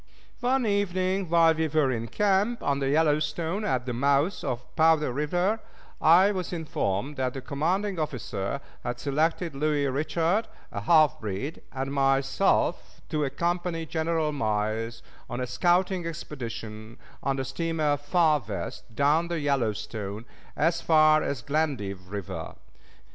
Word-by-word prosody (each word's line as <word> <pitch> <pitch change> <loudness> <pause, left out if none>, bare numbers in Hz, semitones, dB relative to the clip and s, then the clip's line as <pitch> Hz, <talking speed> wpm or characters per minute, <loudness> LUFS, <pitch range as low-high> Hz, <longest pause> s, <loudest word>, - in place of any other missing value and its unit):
One 255 +1 +1
evening, 190 -2 0
while 165 -1 +5
we 160 0 0
were 150 -3 +2
in 115 -2 -2
camp 205 - +1
on 140 -1 +1
the 135 -1 0
Yellowstone 155 +5 +1
at 130 -12 0
the 125 - -3
mouth 140 +8 +1
of 125 -3 -4
Powder 160 -4 +4
River, 175 - 0 0.4
I 180 +6 +6
was 185 -3 -3
informed 145 - -2
that 130 -1 -1
the 135 - -4
commanding 170 +9 -1
officer 125 -5 -3 0.2
had 120 0 -3
selected 160 +4 0
Louis 145 0 +1
Richard, 160 - 0 0.2
a 100 - -4
half 155 +4 +4
breed, 110 - -4
and 135 +1 -3
myself 135 +6 +1
to 150 -2 0
accompany 170 +4 -1
General 160 0 0
Miles 110 -2 -2 0.3
on 120 -1 -4
a 125 - -1
scouting 175 +7 +1
expedition 115 -8 -7 0.2
on 135 - 0
the 135 -1 -2
steamer 155 +1 0
Far 150 0 +2
West, 105 +3 -6
down 150 +5 +3
the 170 -1 -2
Yellowstone 110 -6 -2 0.3
as 165 +2 +2
far 155 -1 +5
as 135 -4 -3
Glendive 130 -12 -2
Creek. 100 -2 -4
150 Hz, 135 wpm, -27 LUFS, 130-170 Hz, 0.4 s, I